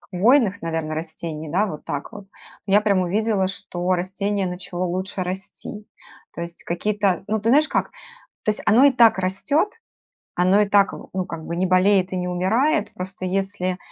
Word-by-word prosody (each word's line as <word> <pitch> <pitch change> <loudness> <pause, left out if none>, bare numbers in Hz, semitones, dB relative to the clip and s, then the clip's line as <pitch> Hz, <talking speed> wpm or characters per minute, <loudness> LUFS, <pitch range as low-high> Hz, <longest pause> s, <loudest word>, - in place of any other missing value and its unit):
хвойных, 210 +1 +2
наверно, 160 -1 -2
растений, 160 -1 -5
да, 195 +7 +2
вот 155 -7 -7
так 145 - -5
вот, 205 - -9 0.4
ну 195 - -2
я 205 - +7
прям 200 -3 +2
увидела, 200 +2 +1
что 180 -1 -3
растение 195 +2 -1
начало 180 0 -4
лучше 185 +2 -3
расти. 190 +3 -6 0.5
То - - -8
есть 170 0 -7
какие-то 195 +1 0
Ну 215 +1 -1
ты 225 +3 +1
знаешь 300 +4 +5
как, - - -1 0.5
то 215 - +2
есть 210 - -6
оно 230 +5 +5
и 285 - +7
так 235 -5 +5
растет, 190 - 0 0.7
оно 185 +3 +4
и 210 - +2
так 200 -1 +4
в - - -10
ну, 185 -1 -1
как 160 -1 -7
бы, 170 - -4
не 185 - +1
болеет 185 0 +3
и - - -1
не 180 0 -2
умирает, 225 - +1
просто 185 0 -6
если 185 -1 -1
190 Hz, 185 wpm, -22 LUFS, 180-210 Hz, 0.7 s, я